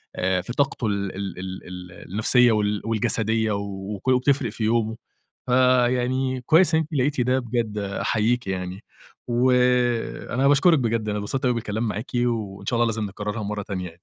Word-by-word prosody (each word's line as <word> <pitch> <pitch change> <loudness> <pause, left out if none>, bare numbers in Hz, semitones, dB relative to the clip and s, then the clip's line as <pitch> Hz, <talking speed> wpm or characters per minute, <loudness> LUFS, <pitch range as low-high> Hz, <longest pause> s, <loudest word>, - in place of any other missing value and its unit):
آآ 90 0 0
في 120 +6 -7
طاقته 135 -5 0
ال 100 -2 -2
ال 95 -2 -5
ال 95 0 -6
ال 90 -1 -9 0.2
النفسية 120 +3 +4
وال 105 -1 0
والجسدية 110 0 +1
وكو 100 +3 -3
وبتفرِق 130 -1 +2
في 110 - -5
يومه، 110 0 +1 0.5
فيعني 130 +1 +2
كويس 160 +5 +4
إن - - +4
أنتِ 155 +1 -7
لقيتِ 140 0 +1
ده 130 +2 +2
بجد 115 -3 -2
أحييكِ 105 +3 0
يعني، 95 +2 -4 0.4
وأنا 125 +1 +1
باشكرِك 145 +2 +5
بجد، 115 -3 -1
أنا 105 - -1
انبسطت 130 +6 -3
أوي 125 - +3
بالكلام 110 0 -2
معاكِ، 110 +4 -5
وإن 115 -5 -1
شاء 120 - 0
الله 120 - +3
لازم 110 -1 -2
نكررها 105 +2 -4
مرّة 105 0 -3
تانية 95 -2 -5
يعني. 85 -1 -9
115 Hz, 165 wpm, -24 LUFS, 100-125 Hz, 0.5 s, باشكرِك